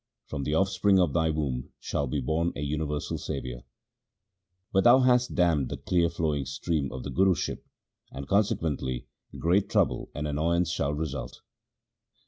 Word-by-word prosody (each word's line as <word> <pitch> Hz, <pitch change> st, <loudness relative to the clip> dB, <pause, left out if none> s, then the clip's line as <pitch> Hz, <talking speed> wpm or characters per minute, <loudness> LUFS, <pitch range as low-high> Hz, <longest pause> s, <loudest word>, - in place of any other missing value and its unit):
From 70 Hz, -3 st, -4 dB
the 75 Hz, -, 0 dB
offspring 95 Hz, +2 st, +3 dB
of 85 Hz, -6 st, +2 dB
thy 80 Hz, -1 st, +2 dB
womb 70 Hz, -5 st, -2 dB
shall 70 Hz, -, -2 dB
be 70 Hz, +2 st, -1 dB
born 80 Hz, +6 st, 0 dB
a -, -, -5 dB
universal 75 Hz, 0 st, -2 dB
saviour; -, -, -5 dB, 1.1 s
but 95 Hz, -, +4 dB
thou 120 Hz, +2 st, +7 dB
hast 125 Hz, -1 st, +3 dB
dammed 85 Hz, -8 st, +2 dB
the -, -, -4 dB
clear 85 Hz, -2 st, +1 dB
flowing 75 Hz, -5 st, -1 dB
stream 75 Hz, 0 st, -2 dB
of 65 Hz, -1 st, -6 dB
the -, -, -5 dB
Guruship, 95 Hz, -1 st, +1 dB, 0.5 s
and 65 Hz, 0 st, -8 dB
conse 100 Hz, +1 st, +3 dB
quently 65 Hz, -5 st, -3 dB, 0.3 s
great 90 Hz, +4 st, +2 dB
trouble -, -, +1 dB
and 75 Hz, +1 st, -2 dB
annoyance 85 Hz, +3 st, +1 dB
shall 75 Hz, -3 st, -1 dB
result.' 75 Hz, -2 st, -5 dB
80 Hz, 155 wpm, -28 LUFS, 70-90 Hz, 1.1 s, thou